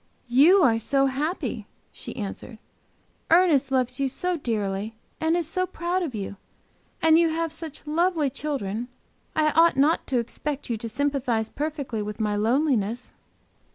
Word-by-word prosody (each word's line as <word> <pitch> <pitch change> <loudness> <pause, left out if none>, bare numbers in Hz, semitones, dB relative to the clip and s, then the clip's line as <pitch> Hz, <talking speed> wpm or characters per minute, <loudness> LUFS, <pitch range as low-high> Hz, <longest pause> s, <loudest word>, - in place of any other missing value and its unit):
"You 345 +9 +7
are 225 -4 +4
so 275 +4 +2
happy," 290 +7 -2 0.2
she - - -7
answered. 215 0 -6 0.7
"Ernest 320 -6 +4
loves 255 -1 +1
you 275 -1 +1
so 360 +7 -1
dearly, 215 - -2 0.2
and 320 +2 +2
is 340 -3 -1
so 370 +3 -1
proud 350 +2 -2
of 305 -9 -3
you, 200 -1 -5 0.7
and 320 0 +6
you 335 -1 +4
have 325 0 -2
such 315 -2 -9
lovely 320 -2 +1
children! 245 -6 -3 0.5
I 305 -1 +3
ought 330 0 +4
not 295 +5 +3
to 260 - 0
expect 270 +3 -3
you 230 - 0
to 230 +1 -5
sympathize 250 -3 0
perfectly 285 -7 -3
with 210 +1 -5
my 210 -1 0
loneliness." 235 0 0
275 Hz, 155 wpm, -25 LUFS, 230-320 Hz, 0.7 s, You